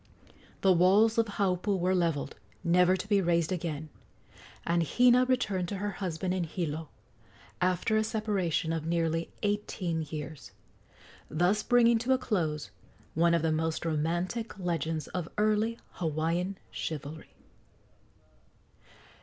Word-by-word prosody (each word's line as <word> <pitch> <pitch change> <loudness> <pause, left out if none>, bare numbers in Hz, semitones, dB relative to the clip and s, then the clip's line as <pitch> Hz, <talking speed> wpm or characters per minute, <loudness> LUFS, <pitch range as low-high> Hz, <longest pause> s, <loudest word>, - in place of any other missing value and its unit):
The 190 - +5
walls 200 +6 +4
of 230 - +3
Haupu 200 -1 0
were 185 +1 +1
levelled, 170 -6 0 0.3
never 180 +2 +4
to 185 - -6
be 205 -2 +3
raised 170 -2 +1
again, 160 -4 -3 0.8
and 170 0 +2
Hina 245 - +4
returned 210 -8 0
to 200 - -4
her 205 +1 -2
husband 180 -1 -3
in 185 -2 0
Hilo, 160 -2 -4 0.7
after 185 +4 +2
a 215 - +3
separation 200 -7 -1
of 165 -2 -2
nearly 165 -1 0
eighteen 205 -5 -1
years, 150 -1 -7 0.8
thus 180 +7 +2
bringing 235 -1 +4
to 250 +3 +2
a - - +3
close 170 - -2 0.4
one 170 +1 +3
of 165 - 0
the 160 - +2
most 160 +1 -1
romantic 175 +9 -1
legends 165 -4 -2
of 175 -3 -4
early 215 +2 +2
Hawaiian 170 +4 -1
chivalry. 155 0 -6
180 Hz, 130 wpm, -30 LUFS, 165-205 Hz, 0.8 s, The